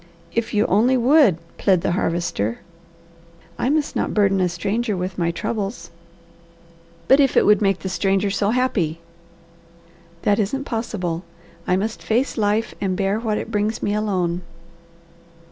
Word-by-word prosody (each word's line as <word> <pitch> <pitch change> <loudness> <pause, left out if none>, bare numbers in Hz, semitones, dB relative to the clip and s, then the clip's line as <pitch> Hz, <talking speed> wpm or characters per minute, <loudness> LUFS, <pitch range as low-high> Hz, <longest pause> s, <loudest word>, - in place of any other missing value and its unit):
"If 230 0 -1
you 210 - +3
only 240 +7 +3
would," 250 - +5 0.2
plead 185 -3 +3
the - - 0
Harvester. 165 - -1 1.0
"I 250 - +1
must 295 0 0
not - - -1
burden 195 -2 +3
a 180 - +2
stranger 200 +5 -2
with 180 0 -4
my 170 -1 +1
troubles." 200 +5 -4 1.2
"But 270 - +6
if 275 -2 +3
it - - +5
would 210 -1 +5
make 195 -2 +2
the - - -4
stranger 195 +1 0
so 200 +1 0
happy!" 215 -10 0 1.2
"That 205 +1 +2
isn't 245 +7 -1
possible. 195 -9 -3 0.4
I 180 - +3
must 215 +4 -2
face 240 +5 0
life 215 +1 0
and 190 -2 -1
bear 200 +1 0
what 220 -2 -1
it 230 - -5
brings 215 +1 -1
me 205 - 0
alone." 185 -5 -1
205 Hz, 150 wpm, -21 LUFS, 185-225 Hz, 1.2 s, But